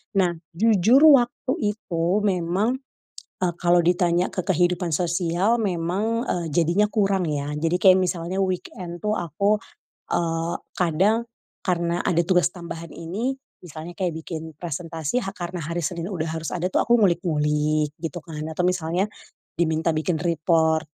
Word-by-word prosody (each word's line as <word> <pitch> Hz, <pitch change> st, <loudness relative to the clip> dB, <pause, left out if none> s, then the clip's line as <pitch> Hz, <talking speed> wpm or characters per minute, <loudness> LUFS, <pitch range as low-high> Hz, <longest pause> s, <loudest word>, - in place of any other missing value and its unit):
nah 185 Hz, -3 st, +3 dB, 0.2 s
jujur 225 Hz, -, +4 dB
waktu 250 Hz, -1 st, +3 dB, 0.2 s
itu 170 Hz, -6 st, -4 dB, 0.2 s
memang, 195 Hz, +6 st, 0 dB, 0.6 s
eee, 180 Hz, -2 st, 0 dB
kalau 175 Hz, 0 st, +5 dB
ditanya 175 Hz, +1 st, +2 dB
ke 185 Hz, -, -1 dB
kehidupan 180 Hz, -1 st, +1 dB
sosial 175 Hz, +5 st, +1 dB
memang, 200 Hz, +6 st, -1 dB
eee, 175 Hz, -2 st, -1 dB
jadinya 175 Hz, +7 st, +2 dB
kurang 195 Hz, -3 st, +1 dB
ya 145 Hz, 0 st, -2 dB
jadi 165 Hz, +4 st, 0 dB
kayak 185 Hz, +1 st, +6 dB
misalnya 180 Hz, +1 st, -1 dB
weekend 180 Hz, -1 st, -4 dB
tuh, 210 Hz, +3 st, -1 dB
aku, 200 Hz, +6 st, 0 dB, 0.5 s
eee, 165 Hz, 0 st, 0 dB, 0.2 s
kadang, 190 Hz, +7 st, +2 dB, 0.4 s
karena 175 Hz, -1 st, 0 dB
ada 170 Hz, -1 st, +2 dB
tugas 180 Hz, -1 st, +3 dB
tambahan 170 Hz, -2 st, -8 dB
ini, 220 Hz, +11 st, -3 dB, 0.3 s
misalnya 165 Hz, +1 st, -9 dB
kayak 180 Hz, -1 st, -1 dB
bikin 160 Hz, -1 st, -7 dB
presentasi 165 Hz, -, -3 dB
ha 195 Hz, -, -4 dB
karena 175 Hz, +1 st, -6 dB
hari 170 Hz, +2 st, -2 dB
Senin 170 Hz, +3 st, -3 dB
udah 165 Hz, -3 st, -2 dB
harus 160 Hz, 0 st, -4 dB
ada 180 Hz, 0 st, -1 dB
tuh -, -, +1 dB
aku 235 Hz, +1 st, +4 dB
ngulik-ngulik 150 Hz, -4 st, +1 dB
gitu 165 Hz, +1 st, -5 dB
kan 155 Hz, -2 st, -7 dB
atau 160 Hz, -, -5 dB
misalnya, 180 Hz, +2 st, 0 dB, 0.5 s
diminta 160 Hz, 0 st, +1 dB
bikin 160 Hz, +1 st, 0 dB
report, 160 Hz, -1 st, +2 dB
175 Hz, 145 wpm, -24 LUFS, 165-190 Hz, 0.6 s, kayak